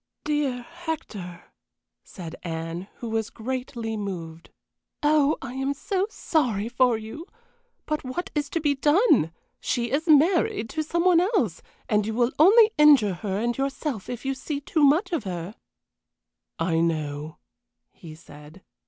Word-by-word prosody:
"Dear 290 -5 -1
Hector!" 260 - -7 0.6
said 170 -4 -9
Anne, 165 +2 -5
who 235 - -6
was 225 0 -1
greatly 240 -1 -4
moved. 170 -6 -6 0.5
"Oh, 300 0 +3
I 255 -2 -6
am 270 +2 -2
so 380 +6 -1
sorry 245 - 0
for 245 -1 +3
you! 225 - -8 0.6
But 305 -1 -2
what 350 +9 -4
is 290 -2 -1
to 330 - -1
be 295 -2 +2
done? 295 - +3 0.3
She 240 -2 -1
is 305 +5 0
married 335 - +3
to 315 - -1
somebody 340 +2 +3
else, 215 - 0 0.3
and 210 -1 +1
you 220 - -3
will 240 +1 +2
only 430 +7 +7
injure 280 -10 +6
her 195 +1 -3
and 235 +3 -1
yourself 270 -4 -3
if 245 +1 -6
you 270 - 0
see 280 +2 -4
too 300 +2 0
much 320 +7 +4
of 330 -9 -1
her." 180 +1 -5 1.0
"I 165 0 +1
know," 155 -2 -2 0.5
he 160 -2 -12
said. 155 +2 -15
250 Hz, 145 wpm, -25 LUFS, 195-305 Hz, 1.0 s, only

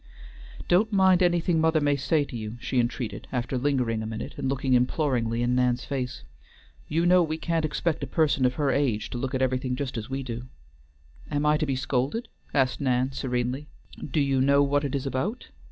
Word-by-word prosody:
"Don't 205 +6 +3
mind 190 -2 +4
anything 175 -2 +2
mother 160 0 +3
may 145 -1 +2
say 145 +2 +1
to 130 - -9
you," 110 0 -5
she 125 - -1
entreated, 120 -3 -2
after 125 +1 -2
lingering 125 -4 0
a 110 - -4
minute, 110 0 -5
and 135 - -2
looking 135 -1 0
imploringly 125 -2 +1
in 120 +1 +1
Nan's 125 0 +1
face. 130 -3 -4 0.6
"You 165 +3 +1
know 180 +1 +6
we 160 -2 -1
can't 165 -1 -1
expect 160 +1 -1
a - - -3
person 155 -5 +1
of 125 0 +2
her 145 -3 +1
age 130 -7 0
to 120 - -4
look 130 +1 -2
at 130 - +1
everything 130 0 0
just 130 -3 -3
as 110 +3 -8
we 135 0 -3
do." 120 0 -6 0.8
"Am 145 +1 -1
I 150 0 +4
to 155 - -1
be 135 - 0
scolded?" 135 - -1 0.2
asked 135 0 +1
Nan, 130 -1 +1
serenely. 130 +2 -2 0.4
"Do 150 +2 -1
you 135 -2 +2
know 140 +1 +4
what 145 +1 +1
it 140 -1 -2
is 140 0 -2
about?" 135 - -3
135 Hz, 200 wpm, -26 LUFS, 125-150 Hz, 0.8 s, know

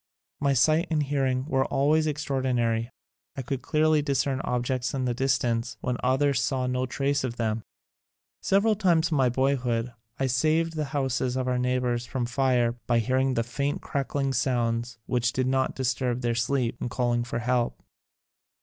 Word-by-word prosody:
My 140 -1 +2
sight 155 +7 +3
and 155 -2 +1
hearing 135 -2 0
were 135 -3 +1
always 155 +3 +2
extraord 145 -2 -2
inary. 115 -2 0 0.5
I 135 - -3
could 135 +1 -3
clearly 155 +3 +2
discern 135 -1 0
objects 125 +1 -1
in 130 -1 -1
the 125 - 0
distance 120 -3 0
when 125 -1 -1
others 135 +1 +2
saw 130 -2 0
no 125 0 -1
trace 140 +2 0
of 120 -2 -3
them. 110 -1 -1 0.8
Several 210 +3 +3
times 170 -5 +2
in 155 - +2
my 130 -2 +4
boyhood 125 -2 0 0.3
I 135 - +1
saved 155 +6 +1
the 155 -1 -1
houses 130 -2 0
of 130 -1 -1
our 125 -1 +1
neighbors 125 -1 0
from 130 -3 -2
fire 125 -1 +2 0.2
by 120 - +3
hearing 130 +3 +1
the 115 - +1
faint 140 +4 -3
crackling 140 0 -1
sounds 120 -2 0
which 120 -2 0
did 130 - 0
not 130 0 0
disturb 125 -1 -1
their 120 -1 0
sleep, 120 0 0
and - - -2
calling 120 +1 0
for 120 -1 -4
help. 120 0 0
130 Hz, 170 wpm, -26 LUFS, 120-140 Hz, 0.8 s, my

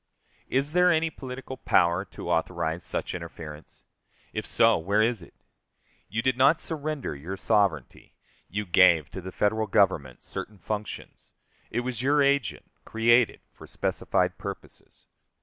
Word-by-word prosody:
Is 135 +3 0
there 180 +1 +4
any 165 -1 +1
political 130 -1 -8
power 85 -5 +2
to - - -6
authorize 80 +2 -1
such - - -3
interference? 75 -1 -9 0.5
If - - -3
so, - - +4
where 100 +6 +2
is 115 0 0
it? - - -15 0.7
You 115 +1 -2
did 130 -1 +2
not 140 +5 +5
surrender 155 - -3
your 85 +8 -6
sovereignty. 100 - 0 0.3
You 105 +4 -3
gave 85 -4 +5
to 95 - -6
the 95 +1 -7
Federal 110 +3 0
Government 85 -11 +1
certain 105 - -6
functions. 105 +2 -6 0.4
It 120 - -1
was 125 -2 -4
your 145 +2 +3
agent, 140 -2 0
created 120 +1 +3
for - - -13
specified - - -1
purposes. - - -9
110 Hz, 140 wpm, -27 LUFS, 90-130 Hz, 0.7 s, not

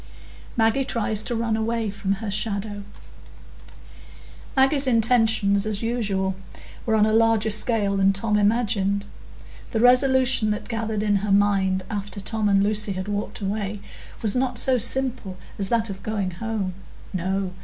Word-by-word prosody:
Maggie 225 +4 +2
Tries 220 -4 -1
to 235 - -4
Run 230 -1 -1
away 225 -1 -2
from 195 -1 -2
Her 205 +1 -5
Shadow 205 0 -3 1.7
Maggie's 270 +1 +3
intentions, 225 -4 +2
as 215 0 -1
usual, 205 -5 -1 0.5
were 220 - +2
on 210 -1 +4
a 215 - +1
larger 225 -1 +3
scale 210 -2 +2
than 195 0 +4
Tom 210 +2 -1
imagined. 205 -2 +1 0.6
The 225 - -2
resolution 255 -1 +4
that 210 - -3
gathered 220 -2 -3
in 205 -1 +2
her 200 +1 -2
mind, 195 -2 +2
after 205 -2 -5
Tom 215 +1 -2
and 195 0 +3
Lucy 210 0 0
had 185 +1 -5
walked 205 +1 -4
away, 205 +1 -3 0.4
was 210 -2 +2
not 250 -1 0
so 260 +1 +4
simple 240 -5 +1 0.2
as 195 -1 +1
that 230 -2 0
of 195 0 -9
going 205 -3 -3
home. 200 0 -4 0.4
No! 190 +1 -2
215 Hz, 150 wpm, -23 LUFS, 200-230 Hz, 1.7 s, on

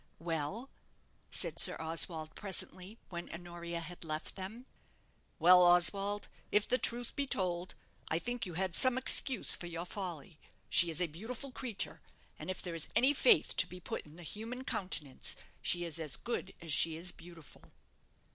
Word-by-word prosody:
"Well?" 165 - -4 0.6
asked - - 0
Sir - - +7
Oswald, 160 0 +1
presently, 195 +1 -3
when 175 -1 -7
Honoria 170 0 -6
had 175 +1 -8
left 155 -1 -4
them. 205 +6 -8 0.7
"Well, 180 +2 +7
Oswald, 190 +4 +4 0.2
if 210 0 +2
the 250 - +1
truth 240 0 0
must - - -20
be 280 -1 -2
told, 180 -5 -1 0.3
I 160 - +1
think 245 +6 -4
you 175 - -8
had 185 0 -2
some 255 +5 +5
excuse 260 -2 +4
for 175 - -7
your 170 0 -5
folly. 175 -5 -7 0.3
She 175 - +8
is 165 +1 -1
a - - +3
beautiful 225 - -7
creature; 245 -5 -3 0.4
and - - -7
if 185 - -5
there 175 - -5
is 165 -2 -2
any 265 +4 +4
faith 460 - +3
to - - +3
be 180 - -10
put 170 - -6
in 150 - -15
the 175 - -12
human 230 +8 -6
countenance, 160 - -1 0.3
she 175 0 +1
is 165 -1 0
as 155 -4 +1
good 235 -5 -5
as 165 -3 -4
she 160 0 +3
is 175 +2 +3
beautiful." 170 -4 -14
175 Hz, 175 wpm, -33 LUFS, 165-210 Hz, 0.7 s, She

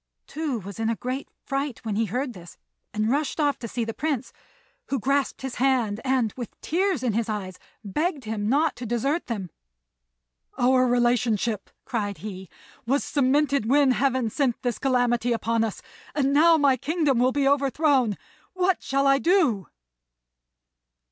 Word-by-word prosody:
Tou 300 -5 -3
was 200 0 -8
in 225 0 0
a 230 - 0
great 255 +4 -4 0.2
fright 275 -3 -3
when 215 -2 -2
he 225 +2 +1
heard 250 +5 -2
this, 175 -3 -13 0.3
and 215 +2 0
rushed 290 +2 -1
off 290 -2 +1
to 230 - -5
see 235 +1 -2
the 225 - -4
Prince, 280 -3 -2 0.5
who 275 - -1
grasped 275 +3 0
his 265 -2 -5
hand 240 -5 +1
and, 255 -5 +1
with 245 -3 -8
tears 360 -4 0
in 240 -4 +1
his 225 +1 -1
eyes, 190 -4 -4 0.2
begged 295 - -2
him 215 -1 -2
not 295 +4 +2
to 245 - -6
desert 275 +8 -1
them. 200 - -4 1.1
"Our 255 0 +4
relationship," 240 -3 +1 0.2
cried 205 -4 -2
he, 190 -4 -8 0.4
"was 275 +3 +2
cemented 280 -2 +1
when 280 0 +5
Heaven 255 -3 +1
sent 260 -2 0
this 245 -2 -1
calamity 245 -3 +1
upon 230 0 0
us; 225 - -4 0.3
and 280 -2 +1
now 325 +3 +6
my 280 -3 +3
kingdom 290 -1 +1
will 255 +1 +3
be 280 0 +1
overthrown. 275 -5 +2 0.4
What 370 -1 +1
shall 275 +1 0
I 275 0 +5
do?" 310 - +2
255 Hz, 160 wpm, -25 LUFS, 225-280 Hz, 1.1 s, now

